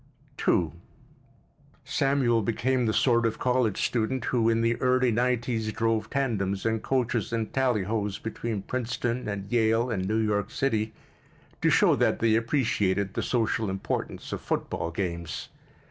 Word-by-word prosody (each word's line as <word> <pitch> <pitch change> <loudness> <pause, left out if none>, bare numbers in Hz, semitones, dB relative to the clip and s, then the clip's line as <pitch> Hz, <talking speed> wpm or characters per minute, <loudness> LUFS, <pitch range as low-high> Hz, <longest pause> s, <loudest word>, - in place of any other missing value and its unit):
II - - +3 1.1
Samuel 135 -4 +2
became 120 +3 0
the - - +2
sort 120 +1 +3
of 115 -1 0
college 125 -5 +1
student 120 +2 -1
who 115 -2 +2
in 115 0 +2
the 115 +1 +2
early 125 0 +2
nineties 120 -2 0
drove 115 0 0
tandems 100 -8 -1
and 110 -1 +1
coaches 120 -5 0
and 115 -2 -2
tallyhos 110 -5 0
between 115 -2 -4
Princeton 125 0 -2
and 100 0 -5
Yale 115 +1 +2
and 95 -4 -1
New 110 +2 +1
York 105 -2 0
City 110 -6 0 0.7
to - - +4
show - - +5
that - - +2
they 115 -1 +2
appreciated 105 -5 +1
the - - -1
social 115 -3 0
importance 95 0 -4
of - - -4
football 85 - -2
games. 85 -2 -4
115 Hz, 145 wpm, -27 LUFS, 105-125 Hz, 1.1 s, show